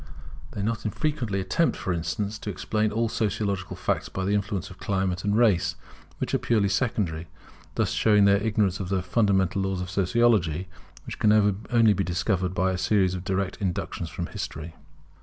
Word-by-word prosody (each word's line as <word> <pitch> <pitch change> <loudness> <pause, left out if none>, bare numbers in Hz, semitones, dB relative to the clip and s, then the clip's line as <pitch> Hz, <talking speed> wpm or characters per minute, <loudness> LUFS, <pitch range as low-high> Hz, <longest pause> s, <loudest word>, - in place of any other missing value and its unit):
They 100 - -3
not 115 +1 -1
unfrequently 115 -3 -1
attempt, 95 - +1
for 95 - -2
instance, 100 +6 -3
to - - -5
explain 105 +2 -1
all 115 +2 +1
sociological 100 -3 -2
facts - - -1
by 95 - -3
the 100 - +1
influence 100 -2 -2
of 90 - -13
climate 95 -2 -1
and 105 +1 +1
race, 110 -8 +3 0.4
which - - -3
are - - +3
purely 105 -4 +2
secondary; 95 -6 -1 0.5
thus - - +1
showing 105 -2 +4
their 100 0 +5
ignorance 105 -3 +1
of 95 -2 -4
the 95 -2 0
fundamental 95 -1 +2
laws 95 -1 -1
of 90 0 -5
Sociology, 95 -4 +2 0.4
which - - -7
can 105 - +4 0.4
only 115 -3 +5
be 100 - 0
discovered 90 +1 -1
by 95 +1 +2
a 90 - -2
series 95 -1 +2
of 90 -1 -5
direct 95 0 -1
inductions 90 -3 -3
from 85 +1 -4
history. 80 0 -6
100 Hz, 175 wpm, -26 LUFS, 90-105 Hz, 0.5 s, their